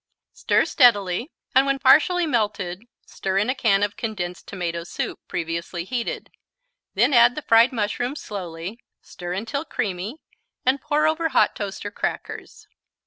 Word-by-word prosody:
Stir - - +2
steadily 230 - +3 0.2
and, 265 +2 +5
when 275 0 +2
partially 325 +6 +5
melted, 210 - -1 0.2
stir 190 0 -3
in 210 +6 +2
a - - 0
can 205 -6 +2
of 205 0 -1
condensed 185 -6 -5
tomato 170 -3 -4
soup, 175 - -4
previously 170 +1 -3
heated. 235 +5 -4 0.6
Then 240 +8 +3
add 240 0 +6
the 305 - -5
fried 230 +2 +5
mushrooms 245 +4 -2
slowly, 180 +1 -6 0.2
stir 175 -1 -7
until 225 +9 -3
creamy 210 - -3 0.5
and 260 +2 +2
pour 300 0 +1
over 320 +1 +1
hot 255 - +3
toast 200 -1 -5
or 205 - -4
crackers. - - -5
220 Hz, 145 wpm, -23 LUFS, 185-260 Hz, 0.6 s, add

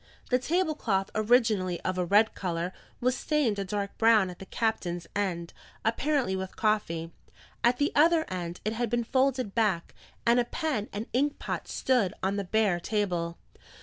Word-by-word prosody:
The 250 - +4
table 320 +4 +1
cloth, 195 -9 -1
originally 215 -5 +2
of 185 - -1
a 180 - +1
red 210 +5 +4
colour, 175 -1 -3 0.3
was 250 +1 +2
stained 265 -8 0
a - - 0
dark 200 +1 -3
brown 220 -5 +5
at 175 - -12
the 195 - -9
captain's 180 -7 -1
end, 175 -4 -2 0.3
apparently 250 -2 +1
with 190 0 -5
coffee; 170 -7 0 0.5
at 240 +1 +4
the 290 +2 +1
other 320 +2 +4
end, 175 -1 -5
it 215 - 0
had 235 0 -1
been 240 +1 +1
folded 260 -3 +1
back, 210 -7 0 0.3
and 235 +1 +5
a 240 - +2
pen 260 -6 -2
and 210 +2 -4
ink 285 +4 +1
pot - - -4
stood 245 -8 +1
on 195 +1 +1
the 200 - -1
bare 195 -2 +2
table. 175 -4 -1
215 Hz, 175 wpm, -28 LUFS, 185-245 Hz, 0.5 s, brown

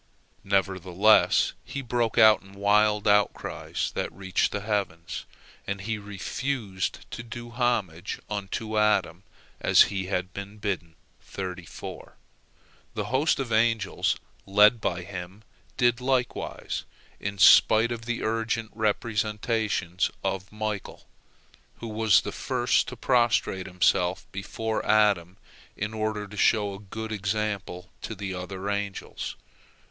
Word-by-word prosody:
Nevertheless 95 +1 +3
he 140 - -5
broke 120 -2 0
out 110 -1 +7
in 95 0 -16
wild 105 +1 +3
outcries 105 0 +1
that - - -2
reached 95 +1 0
the 105 - -3
heavens, 100 -6 -3 0.4
and 100 0 -2
he 110 +2 -3
refused 105 0 -3
to - - -5
do 120 0 -8
homage 110 -8 -1
unto 105 +1 -2
Adam 95 -5 +2 0.4
as - - +6
he 95 -2 -2
had 90 -1 -2
been 100 +1 -7
bidden. 95 -6 -3 0.4
The 90 -3 -5 1.3
host 135 +5 +1
of 130 -4 -3
angels 110 -3 +2 0.3
led 105 +3 +6
by 90 -3 -1
him 95 +2 -8 0.3
did 120 0 +3
likewise, 130 -1 -1 0.4
in 100 0 -4
spite 110 +4 +7
of 115 -1 -5
the 120 0 -2
urgent 115 0 -1
representations 105 -3 0
of 95 0 -2
Michael, 105 -2 -4 0.7
who 115 - -8
was 110 -4 +4
the - - -5
first - - +1
to - - -7
prostrate 120 -7 +2
himself 90 0 +1
before 110 +3 -3
Adam 100 -4 +3 0.4
in 105 +2 -3
order 110 -1 -2
to 105 +1 -11
show 105 -1 +3
a 95 - -8
good 110 +2 -7
example 100 -3 -3
to 110 - -5
the 100 -1 -4
other 95 +2 -5
angels. 100 -1 -3
105 Hz, 120 wpm, -27 LUFS, 95-110 Hz, 1.3 s, out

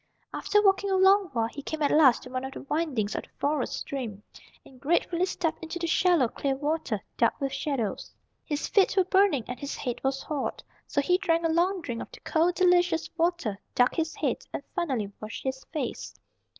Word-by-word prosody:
After 415 0 +2
walking 395 0 +3
for 385 - +2
a - - +3
long 385 +1 +6
while 230 -3 +1
he 255 +5 -6
came 310 +2 -3
at 285 - +2
last 285 -6 +5
to 250 - -10
one 255 0 -3
of 265 0 -5
the - - -7
windings 275 -8 -1
of - - -2
the - - -18
Forest 290 -3 0
stream, 225 -7 -5 0.4
and 255 -2 -17
gratefully 345 +3 +1
stepped 330 -3 -2
into 325 +1 -5
the 345 - -2
shallow, 335 -5 +3
clear 270 +3 -2
water, 290 -7 -2 0.2
dark 235 - +2
with 275 -1 -2
shadows. 270 -6 -2 0.3
His 295 -1 -2
feet 395 -1 +3
were 380 - +6
burning, 375 - +3
and 250 - -6
his 280 -1 -4
head 245 -3 -4
was 270 0 -1
hot. 295 -3 -3 0.2
So 285 - +1
he 360 +6 +2
drank 335 -3 +1
a - - +3
long 355 +3 +2
drink 235 -6 -4
of - - -8
the - - -12
cold, 335 +2 +1
delicious 355 -2 +3
water, 330 - 0 0.2
ducked 245 0 +3
his 320 0 -1
head, - - -1
and - - -5
finally 260 - -1
washed 215 +1 -7
his 265 0 -3
face. 310 -2 -5
305 Hz, 210 wpm, -27 LUFS, 260-350 Hz, 0.4 s, long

